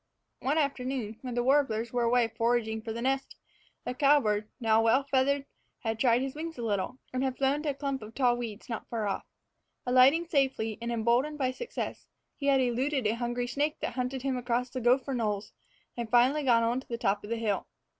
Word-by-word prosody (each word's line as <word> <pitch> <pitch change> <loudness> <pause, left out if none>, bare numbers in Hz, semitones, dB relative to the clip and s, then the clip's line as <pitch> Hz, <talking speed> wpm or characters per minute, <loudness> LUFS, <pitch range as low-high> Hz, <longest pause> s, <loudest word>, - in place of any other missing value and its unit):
One 280 +4 0
afternoon, 255 -6 -2
when 250 -2 -5
the 240 - +1
warblers 245 -4 +2
were 245 - +1
away 235 0 +3
foraging 225 -1 0
for 225 0 -5
the 230 +1 -4
nest, 270 +1 -1 0.5
the - - -2
cowbird, 250 -7 +3
now 225 -2 +3
well 230 +5 +4
feathered, 275 +1 +1 0.4
had 225 -2 -2
tried 245 0 +3
his 270 -1 -3
wings 325 +2 -6
a 240 - -5
little, 205 +1 -1 0.2
and 255 +1 0
had 260 -1 -1
flown 275 +2 +1
to 305 - -2
a - - 0
clump 275 -1 -3
of 215 +1 -10
tall 250 -3 +3
weeds 230 -3 -6
not 230 -3 -5
far 225 -3 -2
off. 200 - -3 0.6
Alighting 260 +7 +5
safely, 265 - 0
and 235 0 -3
emboldened 240 +6 +1
by 260 -3 0
success, 470 - -5 0.3
he 280 - -4
had 275 -1 +5
eluded 255 +2 0
a 210 - +2
hungry 240 +1 -2
snake 290 +5 -1
that - - -2
hunted 250 +1 -3
him 270 -2 0
across 245 0 -1
the 255 -1 -4
gopher 255 +3 +2
knolls, 210 -4 -2 0.4
and 235 -2 -4
finally 250 +5 +4
gone 235 -4 +4
on 235 +2 +1
to - - -13
the 235 - -3
top 205 -4 0
of 205 - -8
the 230 - 0
hill. 210 -4 -1
245 Hz, 210 wpm, -29 LUFS, 230-270 Hz, 0.6 s, Alighting